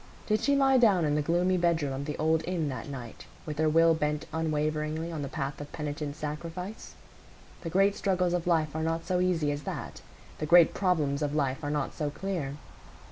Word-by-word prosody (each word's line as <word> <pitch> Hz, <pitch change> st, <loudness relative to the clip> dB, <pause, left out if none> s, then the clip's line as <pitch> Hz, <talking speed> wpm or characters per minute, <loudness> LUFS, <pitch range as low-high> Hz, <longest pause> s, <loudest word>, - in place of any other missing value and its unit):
Did 215 Hz, 0 st, +1 dB
she 280 Hz, +4 st, +3 dB
lie 270 Hz, -2 st, +4 dB
down 200 Hz, -8 st, +4 dB
in 145 Hz, -, +1 dB
the 150 Hz, -, +2 dB
gloomy 175 Hz, +4 st, +2 dB
bedroom 165 Hz, -5 st, +1 dB
of 135 Hz, +1 st, -4 dB
the 150 Hz, -, -4 dB
old 160 Hz, +1 st, +2 dB
inn 170 Hz, -5 st, -1 dB
that 135 Hz, +3 st, -6 dB
night 125 Hz, -5 st, -8 dB, 0.2 s
with 150 Hz, -2 st, -5 dB
her 155 Hz, 0 st, +3 dB
will 165 Hz, +1 st, +5 dB
bent 150 Hz, -1 st, -1 dB
unwaveringly 155 Hz, 0 st, -1 dB
on 160 Hz, -3 st, -4 dB
the 140 Hz, -, -3 dB
path 140 Hz, -1 st, -4 dB
of 145 Hz, -, -8 dB
penitent 150 Hz, -1 st, -4 dB
sacrifice? 165 Hz, +7 st, -6 dB, 0.7 s
The 165 Hz, -, -4 dB
great 195 Hz, +3 st, +3 dB
struggles 180 Hz, -3 st, +1 dB
of 175 Hz, -1 st, -1 dB
life 155 Hz, -3 st, +1 dB
are 160 Hz, -, -1 dB
not 165 Hz, +1 st, -1 dB
so 180 Hz, 0 st, 0 dB
easy 170 Hz, -5 st, +1 dB
as 145 Hz, 0 st, -3 dB
that; -, -, -6 dB, 0.4 s
the 155 Hz, -, -2 dB
great 170 Hz, 0 st, +7 dB
problems 155 Hz, -7 st, +1 dB
of 150 Hz, 0 st, -1 dB
life 135 Hz, -1 st, 0 dB
are 145 Hz, -, -2 dB
not 145 Hz, -2 st, -1 dB
so 150 Hz, -2 st, -2 dB
clear. 145 Hz, -3 st, -4 dB
160 Hz, 205 wpm, -29 LUFS, 150-175 Hz, 0.7 s, great